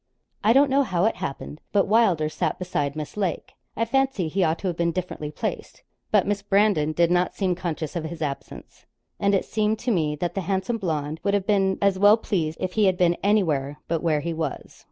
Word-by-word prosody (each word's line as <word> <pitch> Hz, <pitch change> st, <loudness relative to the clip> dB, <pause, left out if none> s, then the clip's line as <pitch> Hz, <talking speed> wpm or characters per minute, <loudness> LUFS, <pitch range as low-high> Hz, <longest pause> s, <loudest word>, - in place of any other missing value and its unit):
I 215 Hz, -, +5 dB
don't 275 Hz, +2 st, +5 dB
know 275 Hz, +1 st, +4 dB
how 185 Hz, -8 st, 0 dB
it 225 Hz, -, +1 dB
happened, 145 Hz, +2 st, -6 dB
but 200 Hz, -2 st, +3 dB
Wylder 195 Hz, -8 st, +3 dB
sat 155 Hz, -, -2 dB
beside 145 Hz, -6 st, -2 dB
Miss 150 Hz, -1 st, -6 dB
Lake. 195 Hz, -4 st, -3 dB, 0.2 s
I 230 Hz, -, +1 dB
fancied 265 Hz, -8 st, 0 dB
he 190 Hz, +4 st, +1 dB
ought 160 Hz, 0 st, +1 dB
to 195 Hz, -, -4 dB
have 175 Hz, -, -1 dB
been 170 Hz, 0 st, 0 dB
differently 170 Hz, -4 st, -4 dB
placed, 150 Hz, -, -5 dB, 0.3 s
but 210 Hz, -3 st, +3 dB
Miss 205 Hz, 0 st, -1 dB
Brandon 200 Hz, -6 st, +2 dB
did 170 Hz, +2 st, +2 dB
not 180 Hz, 0 st, +1 dB
seem 190 Hz, -3 st, 0 dB
conscious 170 Hz, -3 st, -4 dB
of 165 Hz, -2 st, -3 dB
his 165 Hz, +1 st, -6 dB
absence, 145 Hz, -3 st, -7 dB, 0.3 s
and 200 Hz, 0 st, +2 dB
it 195 Hz, -, 0 dB
seemed 215 Hz, 0 st, 0 dB
to 245 Hz, +3 st, -2 dB
me 155 Hz, -7 st, +1 dB
that 175 Hz, +3 st, -3 dB
the 195 Hz, -, -2 dB
handsome 190 Hz, +5 st, -1 dB
blonde 155 Hz, -4 st, -2 dB
would 200 Hz, +2 st, +1 dB
have 200 Hz, -2 st, -1 dB
been 195 Hz, -2 st, +2 dB
as 195 Hz, -1 st, +2 dB
well 205 Hz, +2 st, +7 dB
pleased 165 Hz, -8 st, -2 dB
if 185 Hz, 0 st, -3 dB
he 215 Hz, -2 st, +3 dB
had 185 Hz, -2 st, +2 dB
been 175 Hz, -1 st, +3 dB
anywhere 155 Hz, -9 st, +1 dB
but 165 Hz, -1 st, -1 dB
where 155 Hz, -3 st, +1 dB
he 170 Hz, +1 st, -3 dB
was. 160 Hz, -3 st, -5 dB
185 Hz, 220 wpm, -24 LUFS, 160-205 Hz, 0.3 s, well